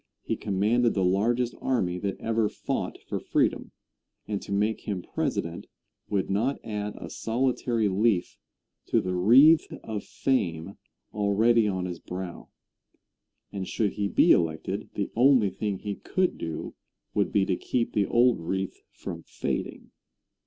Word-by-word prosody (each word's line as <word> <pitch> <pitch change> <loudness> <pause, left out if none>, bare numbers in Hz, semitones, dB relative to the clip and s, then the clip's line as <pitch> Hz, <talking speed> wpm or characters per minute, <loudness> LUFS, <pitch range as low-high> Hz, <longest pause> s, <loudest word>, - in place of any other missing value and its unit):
He - - -1
commanded 110 +4 +1
the 95 - +1
largest 115 +6 +1
army 90 -9 0
that 100 0 -3
ever 110 -1 +1
fought - - -3
for - - -2
freedom, - - 0 0.6
and 105 -2 -2
to - - -9
make 105 +2 +1
him 95 -4 -4
President 100 - -3 0.4
would 100 -3 0
not 115 +8 0
add 105 -1 -4
a - - -8
solitary 120 -1 0
leaf 100 -1 +1 0.5
to - - +3
the 90 - -2
wreath 130 - +6
of 110 -2 -4
fame 95 -8 -1 0.3
already 110 +2 +3
on 95 -2 -1
his 90 -2 -5
brow; 90 -1 -7 1.0
and 95 -2 -4
should 105 -3 0
he 100 -1 -1
be - - +4
elected, 80 -2 +1
the - - -2
only 125 -4 +5
thing 105 -1 -2
he 100 +1 -4
could 185 - -1
do 80 -1 -5 0.4
would 100 - +1
be 100 -2 +3
to 95 - +1
keep 115 +5 -1
the 100 -2 +2
old 120 0 +4
wreath 95 +3 -3
from - - -7
fading. - - -4
105 Hz, 145 wpm, -27 LUFS, 95-115 Hz, 1.0 s, wreath